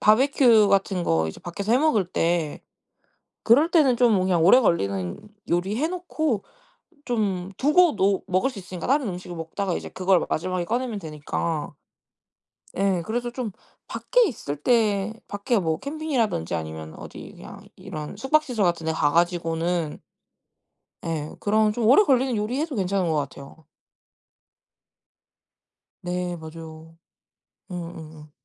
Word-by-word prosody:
바비큐 230 -1 +5
같은 195 -2 +1
거 80 - +1
이제 80 - -9
밖에서 200 +5 -3
해 250 - +5
먹을 280 -10 +2
때 165 -3 -1 0.8
그럴 285 +9 +5
때는 275 -8 +4
좀 235 -4 +4
그냥 185 -3 +2
오래 250 +7 +7
걸리는 100 - 0 0.3
요리 180 +4 0
해 295 +7 0
놓고 315 - -2 0.6
좀 195 -6 -1
두고도 280 - +3
먹을 185 +8 +1
수 245 - -11
있으니까. 180 0 -7
다른 275 -2 +2
음식을 180 -1 -7
먹다가 175 +3 -3
이제 - - -7
그걸 185 -1 +2
마지막에 180 +2 -2
꺼내면 240 +1 -2
되니까. 155 -1 -3 1.0
네 195 -2 +1
그래서 240 +4 -3
좀 245 -4 -4 0.4
밖에 - - +2
있을 150 - -5
때 210 +1 +1 0.2
밖에 205 +2 0
뭐 160 -3 -1
캠핑이라든지 275 - -1
아니면 80 0 -6
어디 - - -10
그냥 - - -11 0.2
이런 180 -2 -7
숙박시설 260 -3 +1
같은데 165 -2 0
가 155 -2 +1
가지고는 170 -1 0 1.1
네 155 -2 -3
그런 215 +1 +2
좀 225 -1 -1
오래 270 - +7
걸리는 265 - +2
요리 215 +6 -2
해도 315 -3 -2
괜찮은 190 -2 0
거 160 - 0
같아요. 140 +2 -6 2.4
네 180 -1 -3
맞아요. 160 0 -11 0.8
응. - - -4 0.2
응응. 155 -1 -12
190 Hz, 280 characters per minute, -24 LUFS, 165-240 Hz, 2.4 s, 오래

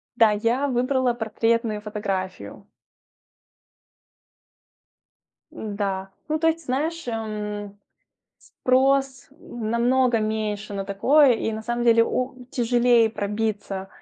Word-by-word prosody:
Да, 225 -2 +5
я 230 +6 0
выбрала 255 0 +1
портретную 225 -1 -1
фотографию. 200 -3 -5 2.9
М-да. 200 -3 -3 0.2
Ну, 310 0 0
то 325 - +2
есть, 325 0 +1
ты 330 - -17
знаешь, 310 +5 -2
эм, 210 -3 -4 0.6
спрос 265 0 +1
намного 240 0 +1
меньше 215 -1 -3
на 195 - -3
такое, 260 +8 +4
и 225 0 -2
на 220 0 -5
самом 240 +1 -2
деле 230 -1 +5
о 255 +3 -2 0.2
тяжелее 240 -1 +3
пробиться, 205 -2 -3
230 Hz, 105 wpm, -24 LUFS, 210-255 Hz, 2.9 s, Да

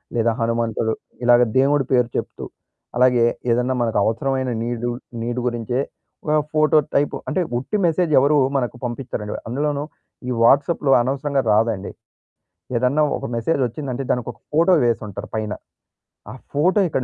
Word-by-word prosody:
లేదా 115 0 +2
హనుమంతుడు 115 -1 0 0.3
ఇలాగ 120 0 +6 0.2
దేవుడి 140 +1 +3
పేరు 125 -2 +3
చెప్తూ - - -4 0.5
అలాగే 125 -1 +4 0.3
ఏదన్నా 125 +2 +1
మనకు 115 -2 0
అవసరమైన 130 +4 0
నీడుల్ 120 0 -2 0.3
నీడ్ 120 +2 -2
గురించే 120 +1 -1 0.5
ఒక 155 0 +2 0.2
ఫోటో 155 0 +4 0.2
టైప్ 145 +1 +2
అంటే 185 - 0 0.2
ఉట్టి 175 +11 -3
మెసేజ్ 170 0 +1
ఎవరూ 145 +3 +3 0.2
మనకు 125 -1 -2
పంపిచ్చరండి. 120 -4 -4
అందులోనూ 145 +3 -1 0.4
ఈ - - -1
వాట్సాప్‌లో 140 +3 +3
అనవసరంగా 140 +2 0
రాదండి. 110 -3 0 0.9
ఏదన్నా 130 +5 +2
ఒక - - -7
మెసేజ్ 135 +6 0
వచ్చిందంటే 135 +1 -5
దానికొక 120 -1 -3
ఫోటో 170 +4 +4
వేసుంటారు 105 -3 -2
పైన. 110 -1 -2 0.8
ఆ - - -8 0.2
ఫోటో 180 +8 +3
ఇక్కడ 135 - -1
125 Hz, 135 wpm, -21 LUFS, 115-140 Hz, 0.9 s, ఇలాగ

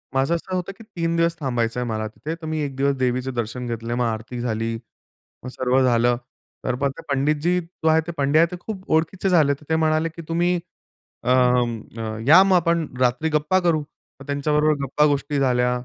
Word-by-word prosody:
माझं 135 +5 +2
असं 185 +2 -4
होतं 180 +1 -3
की 225 - -12
3 170 -6 -2
दिवस 165 0 +2
थांबायचं 120 -4 -1
आहे 125 - -2
मला 110 0 -2
तिथे, 155 +9 -6
तर 165 -1 -11
मी 155 0 -2
1 140 -2 -4
दिवस 140 +1 +1
देवीचे 130 0 0
दर्शन 120 +1 -4
घेतले, 115 0 -4
मग 120 0 0
आरती 115 +2 -4
झाली, 115 -1 -2 0.7
मग - - -5
सर्व 130 +1 +1
झालं. 120 -1 +3 0.5
तर 130 - 0 0.4
पंडितजी 150 +5 +1
जो 165 -1 -4
आहे 160 0 +5
ते 170 - -4
पंडे 140 +2 +3
आहेत 165 +1 +5
ते - - -3
खूप 190 -1 -8
ओळखीचे 175 +4 0
झाले. 155 -6 +4
तर 145 - -17
ते 160 - +3
म्हणाले, 160 0 +2
की 165 +1 -10
तुम्ही 175 +2 +1 0.7
अं, 120 -3 +1
या 165 +6 +8
मग 190 -1 +4
आपण 170 -2 +1
रात्री 130 +5 +2
गप्पा 150 +4 +2
करू. 170 -3 +2 0.4
मग 135 - -11
त्यांच्याबरोबर 150 +2 +1
गप्पा-गोष्टी 145 +1 +1
झाल्या 125 -2 +2
145 Hz, 190 wpm, -22 LUFS, 125-165 Hz, 0.7 s, या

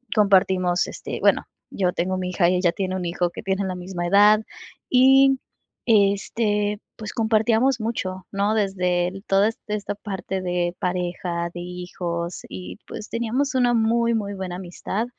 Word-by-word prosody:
compartimos, 190 -4 +3
este, - - -6
bueno, - - +3 0.2
yo 180 -2 0
tengo 185 +2 -1
mi 185 0 -3
hija 175 -1 +2
y 185 - +2
ella 180 -1 +2
tiene 185 +1 -3
un 185 -1 -3
hijo 175 +1 0
que - - -9
tiene 195 +1 0
la 185 -1 -3
misma 180 -1 -5
edad, 205 +3 +6 0.5
y, 270 +1 +6 0.5
este, 205 0 +2 0.2
pues, 215 -1 -7
compartíamos 225 +3 +2
mucho, 190 -5 -3
¿no?, 200 +2 +1
desde 180 -4 +1 0.2
toda 195 +2 +4 0.2
esta 210 -1 -3
parte 195 -2 -4
de 175 -1 -1
pareja, 175 -1 -2
de 175 - -6
hijos 175 -1 -5
y 90 0 -8
pues, 215 - -7
teníamos 235 +5 -1
una 245 -2 +3
muy, 230 +1 +2
muy 205 -2 -2
buena 190 -2 -5
amistad, 185 +4 -4
195 Hz, 155 wpm, -23 LUFS, 180-215 Hz, 0.5 s, edad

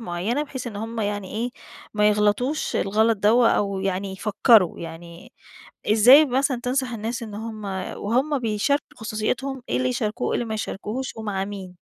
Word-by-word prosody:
معيّنة 215 +7 -2
بحيث 265 -4 -6
إن 220 -4 -6
هم 225 +2 -4
يعني 205 -2 -3
إيه، 235 +3 -2 0.4
ما 210 0 +4
يغلطوش 210 +8 +1
الغلط 220 +3 +2
دوّة 230 +4 +4
أو 200 -1 0
يعني 195 0 -2
يفكّروا؟ 210 -1 +3
يعني 170 +1 -10 0.6
إزاي 250 +8 +8
مثلًا 265 -1 0
تنصح 255 0 -1
الناس 230 +1 -4
إن 215 -3 -7
هم 215 0 -6 0.3
وهم 260 +8 0
بيشاركوا 240 +5 -1
خصوصيتهم، 245 +4 -3
إيه - - 0
اللي 130 0 +1
يشاركوه 210 - -2
وإيه - - -1
اللي - - -1
ما 220 - -3
يشاركوهوش 220 +4 -4
ومع 205 -3 -2
مين؟ 190 -3 -8
215 Hz, 160 wpm, -24 LUFS, 200-245 Hz, 0.6 s, إزاي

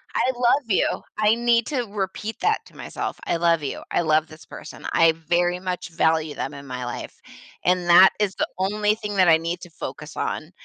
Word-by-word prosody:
I 260 - +2
love 245 +4 +2
you." 200 - +1 0.2
I 215 +1 +4
need 235 -1 +2
to 265 -5 -1
repeat 205 +1 -4
that 435 +1 +1
to - - -20
myself. - - -5
"I 170 - 0
love 170 -2 +2
you. 140 - -4
I - - +2
love 155 -1 +2
this 155 0 -14
person. - - -11
I 165 -1 +5
very 175 +2 0
much 180 -2 -4
value 160 -2 +1
them - - -4
in 140 0 -10
my 125 -1 -5
life, 120 - -7 0.5
and 180 -1 +2
that 180 +2 +8
is 205 -2 0
the - - -1
only 210 +2 +1
thing 210 -1 -5
that 185 -2 +4
I 160 -1 +7
need 170 +2 -4
to 175 - -10
focus - - -8
on. - - -3
180 Hz, 210 wpm, -23 LUFS, 160-210 Hz, 0.5 s, that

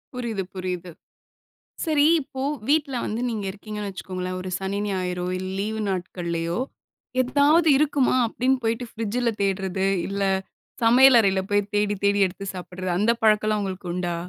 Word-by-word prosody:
புரியுது, 230 -6 -3
புரியுது. 180 -1 -4 0.9
சரி 305 -3 +3 0.2
இப்போ 265 -1 -6 0.3
வீட்ல 290 -2 +2
வந்து 220 +2 -3
நீங்க 215 -3 -3
இருக்கீங்கன்னு 210 +1 -6
வச்சுக்கோங்களேன் 185 -1 -5
ஒரு 185 0 -5
சனி, 195 +1 -3
ஞாயிறோ 180 -2 -2
இல்ல, 185 0 -4
லீவு 220 +2 -2
நாட்களையோ 175 -2 -2 0.6
ஏதாவது 290 +6 +4
இருக்குமா? 285 -3 +2
அப்படின்னு 255 +3 +1
போய்ட்டு 230 +2 -1
ஃப்ரிட்ஜில 230 +2 -1
தேடுறது, 190 -1 0 0.2
இல்ல 200 0 -2 0.6
சமையல் 245 +2 +7
அறையில 195 -3 +2
போய் 205 0 +1
தேடி 205 0 +2
தேடி 200 0 +3
எடுத்து 190 +2 -7
சாப்பிடுறது 185 0 -5
அந்த 210 +4 +3
பழக்கம்லாம் 215 -1 +3
உங்களுக்கு 190 -2 -5
உண்டா? 175 -1 -2
200 Hz, 140 wpm, -24 LUFS, 185-235 Hz, 0.9 s, சமையல்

